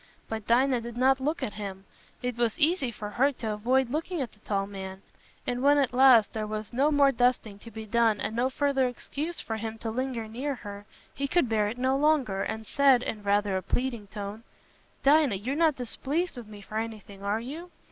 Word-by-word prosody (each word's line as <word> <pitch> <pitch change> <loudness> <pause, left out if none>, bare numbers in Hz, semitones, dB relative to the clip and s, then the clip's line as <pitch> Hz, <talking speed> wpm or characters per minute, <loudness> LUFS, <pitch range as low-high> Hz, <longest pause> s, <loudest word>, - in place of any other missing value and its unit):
But 220 -1 -5
Dinah 250 +1 +3
did 235 0 -7
not 265 +2 +4
look 300 +5 -1
at 210 - -3
him—it 205 +4 -7
was 235 -2 0
easy 310 -3 +2
for 210 -2 -7
her 270 +6 +3
to 225 -3 -4
avoid 245 +4 +1
looking 325 +4 -2
at 250 -5 -3
the 210 - -24
tall 200 -2 -1
man—and 195 +5 -7
when 285 +2 +5
at 275 -3 +2
last 250 -4 +6
there 215 -1 -3
was 215 +1 -5
no 275 +5 +3
more 285 -2 +5
dusting 245 -5 +1
to 230 - -11
be 220 0 -8
done 225 -1 +2
and 220 - -3
no 245 +2 +2
further 270 -1 +1
excuse 295 +7 -5
for 225 - -4
him 225 0 -5
to 225 0 -4
linger 245 -2 -3
near 265 +6 -3
her, 205 -3 -9 0.3
he 280 +1 -2
could 340 -1 +2
bear 215 -2 +1
it 220 +4 -4
no 260 +1 +1
longer, 275 -9 +2
and 220 +1 -3
said, 270 0 +4
in 215 - -4
rather 205 -1 +1
a 190 - 0
pleading 235 +2 -2
tone, 205 +1 -6 0.6
"Dinah, 285 -5 +5
you're 235 +8 -3
not 315 -2 +3
displeased 280 +7 -2
with 240 -3 -9
me 210 -1 -11
for 215 +2 -4
anything, 215 -3 -7
are 200 +2 0
you? 305 +9 -7
235 Hz, 210 wpm, -28 LUFS, 210-270 Hz, 0.6 s, last